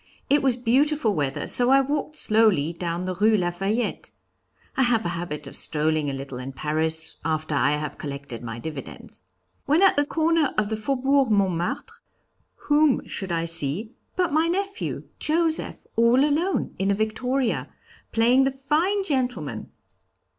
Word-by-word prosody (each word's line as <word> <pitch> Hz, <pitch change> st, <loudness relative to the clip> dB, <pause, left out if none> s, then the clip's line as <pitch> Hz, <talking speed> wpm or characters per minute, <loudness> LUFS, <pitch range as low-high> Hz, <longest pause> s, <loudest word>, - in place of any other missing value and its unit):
It 290 Hz, 0 st, +5 dB
was 260 Hz, -3 st, +2 dB
beautiful 255 Hz, 0 st, +2 dB
weather, 140 Hz, -5 st, -2 dB
so 245 Hz, 0 st, +3 dB
I 270 Hz, +1 st, +6 dB
walked 290 Hz, +2 st, -2 dB
slowly 210 Hz, -, +3 dB
down 170 Hz, +1 st, -3 dB
the 185 Hz, -, -2 dB
Rue 215 Hz, +4 st, +3 dB
Lafayette. 195 Hz, +6 st, -2 dB, 0.7 s
(I -, -, +1 dB
have 240 Hz, -3 st, +2 dB
a -, -, 0 dB
habit 170 Hz, -4 st, -5 dB
of 135 Hz, -, -9 dB
strolling 155 Hz, -1 st, +2 dB
a -, -, -3 dB
little 135 Hz, -2 st, -6 dB
in 130 Hz, +2 st, -7 dB
Paris 160 Hz, +2 st, -1 dB
after 155 Hz, 0 st, -2 dB
I 145 Hz, 0 st, +2 dB
have 150 Hz, -1 st, -4 dB
collected 140 Hz, -5 st, -7 dB
my 115 Hz, -1 st, -6 dB
dividends.) 145 Hz, +3 st, -8 dB, 0.5 s
When 310 Hz, +7 st, +4 dB
at 385 Hz, -, +5 dB
the 290 Hz, -, +3 dB
corner 320 Hz, -2 st, +1 dB
of 210 Hz, -1 st, +1 dB
the 220 Hz, -, -1 dB
Faubourg 270 Hz, +3 st, +1 dB
Montmartre, 185 Hz, -5 st, -1 dB, 0.7 s
whom 295 Hz, -2 st, +3 dB
should 190 Hz, -2 st, -5 dB
I 165 Hz, 0 st, 0 dB
see 165 Hz, +6 st, -2 dB, 0.2 s
but 360 Hz, -5 st, 0 dB
my 315 Hz, +2 st, +3 dB
nephew, 395 Hz, +3 st, -3 dB, 0.2 s
Joseph, 320 Hz, +1 st, 0 dB
all 235 Hz, +4 st, +4 dB
alone 325 Hz, +6 st, 0 dB
in 195 Hz, +1 st, +1 dB
a 200 Hz, -, +3 dB
victoria, 245 Hz, +4 st, -1 dB, 0.4 s
playing 245 Hz, +4 st, +4 dB
the -, -, +3 dB
fine 310 Hz, +9 st, 0 dB
gentleman. 245 Hz, -, -2 dB
220 Hz, 155 wpm, -24 LUFS, -, 0.7 s, I